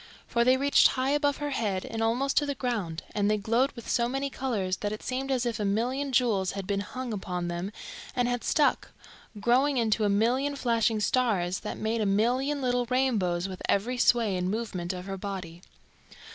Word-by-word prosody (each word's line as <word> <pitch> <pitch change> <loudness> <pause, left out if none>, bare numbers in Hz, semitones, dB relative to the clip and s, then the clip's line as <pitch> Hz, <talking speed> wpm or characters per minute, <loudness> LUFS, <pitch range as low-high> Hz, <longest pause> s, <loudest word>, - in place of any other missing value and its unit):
For 235 - +2
they 255 +2 +4
reached 280 +1 +5
high 260 +1 0
above 290 -1 +1
her 290 0 -3
head 205 -7 -1
and 225 - -4
almost 245 +5 +1
to 290 - +3
the 285 - -2
ground, 215 -11 -3
and 205 -1 +1
they 215 - +2
glowed 230 +6 +1
with 235 - -10
so 235 -1 +1
many 270 +2 -2
colours 200 -10 -2
that 205 - -3
it 215 - -6
seemed 265 +1 -3
as 255 -2 0
if 230 -3 -2
a - - -1
million 245 +8 0
jewels 215 -8 +2
had 195 -1 -5
been 200 +1 -1
Hung 245 +4 -5
upon 180 -3 -3
them 175 +3 -4 0.4
and 245 -1 +1
had 245 -1 -1
stuck, 300 -2 +1 0.5
growing 260 +5 +3
into 220 -2 +2
a 205 - +3
million 250 +8 +1
flashing 230 -4 +1
stars 195 -6 +1
that - - -5
made 220 +1 -1
a 210 - +1
million 255 +8 +1
little 245 -1 +1
rainbows 215 -9 +1
with 185 -1 -8
every 245 +5 +1
sway 230 -5 +3
and 180 0 -1
movement 195 -5 -3
of 180 -1 -6
her 195 0 -5
body. 185 -4 -6
230 Hz, 200 wpm, -28 LUFS, 195-255 Hz, 0.5 s, reached